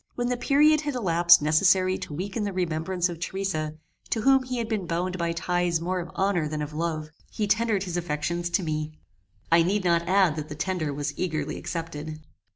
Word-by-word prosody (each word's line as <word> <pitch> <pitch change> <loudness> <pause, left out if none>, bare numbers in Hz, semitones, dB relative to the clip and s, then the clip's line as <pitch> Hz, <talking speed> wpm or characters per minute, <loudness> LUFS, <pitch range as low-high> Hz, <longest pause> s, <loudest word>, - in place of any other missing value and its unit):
When 245 0 -1
the 250 - +1
period 300 +5 +4
had 290 -3 -3
elapsed 175 -7 +5
necessary 185 +4 +4
to - - -7
weaken 200 +6 -3
the 205 - -2
remembrance 175 0 -1
of 170 -2 -7
Theresa, 170 -4 -3 0.3
to 225 - 0
whom 270 +3 +5
he 255 -1 -4
had 230 -2 -2
been 210 -5 -2
bound 180 +2 -2
by 170 0 0
ties 175 0 0
more 180 +2 -2
of 170 -1 -6
honor 190 -5 +1
than 150 0 -3
of 150 +1 -7
love, 155 -1 -3 0.2
he 215 - -2
tendered 210 -1 +1
his 180 -2 -3
affections 170 +1 -2
to 185 +2 0
me. 155 -1 -3 0.6
I 165 0 +6
need 190 +4 +1
not 170 -1 +2
add 185 -5 +3
that 155 0 -5
the 150 - -6
tender 155 -1 -2
was 145 +1 -3
eagerly 155 -4 -2
accepted. 155 -2 -5
175 Hz, 200 wpm, -26 LUFS, 155-195 Hz, 0.6 s, I